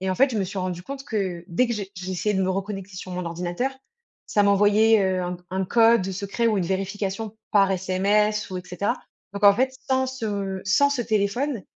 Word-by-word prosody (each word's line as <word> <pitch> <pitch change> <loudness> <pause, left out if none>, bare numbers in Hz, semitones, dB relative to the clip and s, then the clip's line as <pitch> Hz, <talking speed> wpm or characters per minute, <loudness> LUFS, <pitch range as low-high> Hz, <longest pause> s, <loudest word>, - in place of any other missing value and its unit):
et 190 0 -1
en - - 0
fait 270 +4 +4
je 220 - -1
me 195 - +1
suis 195 +1 -5
rendue 180 -1 -3
compte 270 +5 -7
que 190 -6 -2
dès 215 +9 +2
que 235 - -2
je 210 -3 -3
j'essayais 185 +2 -2
de 190 - +1
me 185 - +1
reconnecter 195 0 -4
sur 185 - -7
mon 180 0 -3
ordinateur, 175 +9 -2 0.6
ça 205 - +2
m'envoyait, 205 +2 +4
heu, 185 -1 0
un 180 0 -4
un 190 +1 -1
code, 230 -1 +4
heu, 195 - -3
secret 200 +4 -2
ou 215 -3 +2
une 175 - -1
vérification 195 +3 -3 0.2
par 195 -2 +5
sms 200 +3 +1
ou 185 - -3
et - - -7
cetera, 180 +3 -1 0.4
donc 200 +1 -6
en 200 0 +8
fait 260 +3 0
sans 260 0 +2
ce 205 -7 -3
sans 285 +8 +4
ce 285 -3 -1
téléphone, 220 +3 0
200 Hz, 220 wpm, -24 LUFS, 185-220 Hz, 0.6 s, en